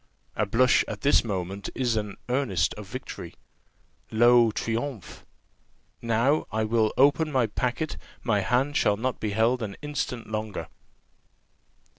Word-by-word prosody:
A 105 - 0
blush 125 +4 +4
at - - -6
this 140 - +4
moment 95 -2 -4
is 125 -3 0
an 105 -2 -3
earnest 125 - +1
of - - -9
victory. - - -7 0.7
Lo, 120 +1 +5
triumphe! 115 0 -4 0.7
Now 115 +6 +1
I 110 +1 0
will 110 0 +2
open 145 +3 +4
my 130 -4 +3
packet; 125 +8 -2 0.3
my 105 -4 +2
hand 130 +7 +1
shall 105 -7 +3
not 125 +3 -2
be 110 - -2
held 115 +4 +2
an 105 -3 -4
instant 135 -5 -3
longer." 110 -2 -4
115 Hz, 135 wpm, -26 LUFS, 110-130 Hz, 0.7 s, Lo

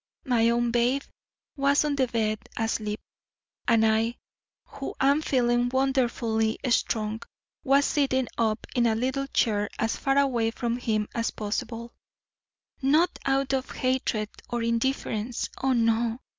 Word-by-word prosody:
My 235 -3 +3
own 235 0 +1
babe 245 +4 +2 0.5
was 280 +1 +3
on 295 -1 0
the 265 -2 +2
bed 215 -2 0 0.2
asleep, 220 -2 -1 0.7
and 225 -2 +4
I, 225 +2 +2 0.5
who 275 - -7
am 280 +3 +3
feeling 245 -4 +2
wonderfully 240 -4 +1
strong, 220 -1 0 0.4
was 275 +1 +4
sitting 260 -3 +1
up 220 -1 0
in 240 -1 +3
a 220 - +2
little 260 +4 -1
chair 210 -6 +1
as 225 +1 0
far 270 0 +1
away 245 -5 +2
from 235 +1 -2
him 215 -4 -1
as 230 -1 0
possible, 230 +2 -4 0.9
not 310 +6 +3
out 270 0 +1
of 265 -1 -1
hatred 255 -5 -1 0.2
or 240 -1 -2
indifference 230 -1 -1
oh, 265 0 +2
no! 230 0 +1
240 Hz, 135 wpm, -27 LUFS, 225-265 Hz, 0.9 s, and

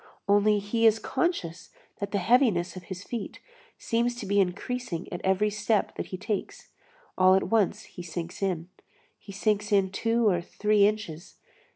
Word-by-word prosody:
Only 205 +1 +4
he 225 +3 +2
is 220 0 +4
conscious 200 - -2 0.3
that 200 - -3
the 200 - -1
heaviness 200 -4 +2
of 180 -1 -9
his 185 +1 -7
feet 230 -4 -6 0.4
seems 235 +1 0
to 240 - -6
be 200 +1 +2
increasing 190 0 -2
at 175 - -5
every 190 +2 +2
step 210 +1 0
that - - -5
he 185 - -6
takes. 205 +1 -4 0.5
All 185 0 +6
at 190 - 0
once 220 -4 +2
he - - -11
sinks 170 +1 -6
in. 180 -3 -2 0.5
He 200 - -11
sinks 205 +1 0
in 195 -2 +3
two 230 +3 +1
or 180 -4 +2
three 210 +3 +2
inches. 200 -6 -5
200 Hz, 170 wpm, -27 LUFS, 185-215 Hz, 0.5 s, All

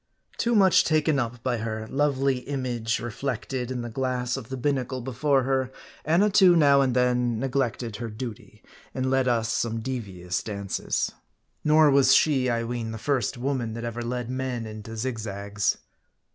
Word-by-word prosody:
Too 235 0 +2
much 190 -3 +6
taken 155 -2 +2
up 120 -1 -4
by 125 -2 0
her 110 -1 -4
lovely 135 -1 +1
image 125 -4 -3
partially 115 - -1
reflected 125 +1 -3
in 125 -2 -3
the 120 - -5
glass 125 -1 -1
of 130 -3 -7
the 130 - -4
binnacle 130 -1 -1
before 135 +2 +1
her, 130 0 0 0.3
Annatoo 190 +2 +5
now 140 -4 +5
and 130 -2 +1
then 125 -2 +2
neglected 125 -4 -1
her 120 -1 -5
duty, 110 -1 -8 0.3
and 130 0 -1
led 135 -1 +2
us 115 -2 +1
some 115 -1 -1
devious 100 -8 -4
dances. 100 -2 -2 0.5
Nor 150 0 +5
was 135 -1 +6
she, 135 -5 +3
I 115 -1 0
ween, 115 -1 -3
the - - -5
first 130 0 -1
woman 120 -3 -2
that 115 - -5
ever 120 0 -4
led 120 0 -3
men 130 -2 -3
into 110 +1 -8
zigzags. 105 -4 -2
125 Hz, 165 wpm, -26 LUFS, 115-135 Hz, 0.5 s, much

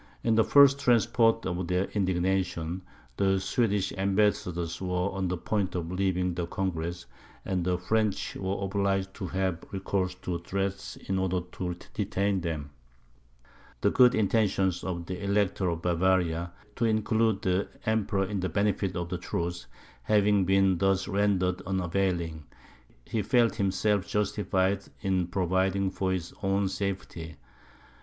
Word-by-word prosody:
In 115 - +2
the 110 0 +5
first 140 +1 +6
transports 120 -3 +3
of 90 -1 -2
their 90 +1 +1
indignation, 95 -2 0 0.4
the 95 -1 +2
Swedish 100 -2 0
ambassadors 95 -4 0
were 90 +1 -1
on 95 -1 -2
the 90 +1 -2
point 95 0 -1
of 85 -1 -3
leaving 90 -1 0
the 85 0 -3
congress, 85 - -3 0.4
and 95 -2 -1
the 90 0 +1
French 105 +3 0
were 95 +1 -3
obliged 95 0 0
to 95 - -5
have 95 -1 -1
recourse 95 -1 -2
to 85 -1 -2
threats 100 +2 -3
in 95 0 -3
order 95 -1 0
to 90 -1 -4 0.2
detain 100 -1 0
them. 80 -4 -4 1.1
The - - +3
good 125 -1 +6
intentions 100 -4 +1
of 85 -2 -3
the 90 +2 -5
Elector 100 -2 +1
of 85 0 -3
Bavaria, 85 -1 +1 0.3
to 115 - +1
include 110 -1 +1
the 95 +1 +1 0.2
Emperor 105 -3 +1
in 100 0 -3
the 95 0 -1
benefit 100 +1 0
of 85 -1 -3
the 90 -1 -3
truce, 85 -5 -3 0.3
having 105 -2 +3
been 95 -1 +3
thus 95 0 +2
rendered 95 -2 +1
unavailing, 90 -4 -1 0.6
he 110 - -1
felt 120 +1 +3
himself 100 0 +1
justified 100 -2 0 0.2
in 95 -3 0
providing 95 +1 +1
for 95 -1 -1
his 90 -2 -3
own 95 0 +1
safety. 95 -4 -4
95 Hz, 140 wpm, -28 LUFS, 90-100 Hz, 1.1 s, first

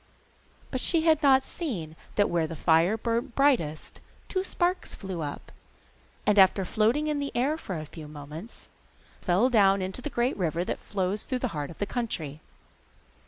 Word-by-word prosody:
But 260 - -2
she 335 -2 +3
had 315 -2 +4
not 265 -2 +5
seen 190 - -5 0.2
that 205 - +4
where 170 -2 0
the 165 - -6
fire 165 +6 +3
burnt 235 +3 -2
brightest 245 - +1 0.3
two 375 -1 0
sparks 365 -1 -1
flew 190 -4 -5
up, 145 -2 -6 0.7
and, 210 0 +4
after 190 0 +5
floating 225 +10 +2
in 300 -1 0
the 280 0 -3
air 270 +6 +2
for 190 - -5
a 155 - -5
few 155 0 -10
moments, 150 +7 -10 0.5
fell 185 +6 +3
down 200 -4 +5
into 190 +6 -4
the 295 - -4
great 245 0 0
river 170 -1 -1
that - - -3
flows 200 +1 -2
through 255 - -2
the - - -1
heart 145 -2 -3
of 170 - -11
the 205 - -1
country. 160 - -4
205 Hz, 175 wpm, -28 LUFS, 165-265 Hz, 0.7 s, not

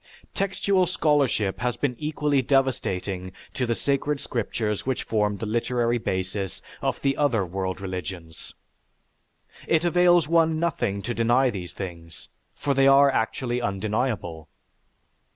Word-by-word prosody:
Textual 195 -1 +1
scholarship 145 - +1
has 120 0 -1
been 135 -4 -1
equally 150 -2 +1
devastating 100 -9 0 0.2
to 125 - -1
the 115 - +1
sacred 140 +2 0
scriptures 110 -4 -2
which 130 -1 -1
form 105 -2 0
the 110 - -4
literary 120 +2 0
basis 95 -1 -3 0.2
of - - -1
the 135 -1 +2
other 125 -9 +1
world 95 +1 -3
religions. 90 -3 -7 1.1
It 165 +1 +2
avails 175 -2 +4
one 165 -1 +3
nothing 100 -12 -1
to 120 - -2
deny 120 +3 +3
these 90 -4 -6
things, 85 -4 -8 0.3
for 140 - -1
they 135 0 +4
are 140 0 +6
actually 120 +1 -1
undeniable. 100 -5 -2
120 Hz, 130 wpm, -25 LUFS, 95-140 Hz, 1.1 s, are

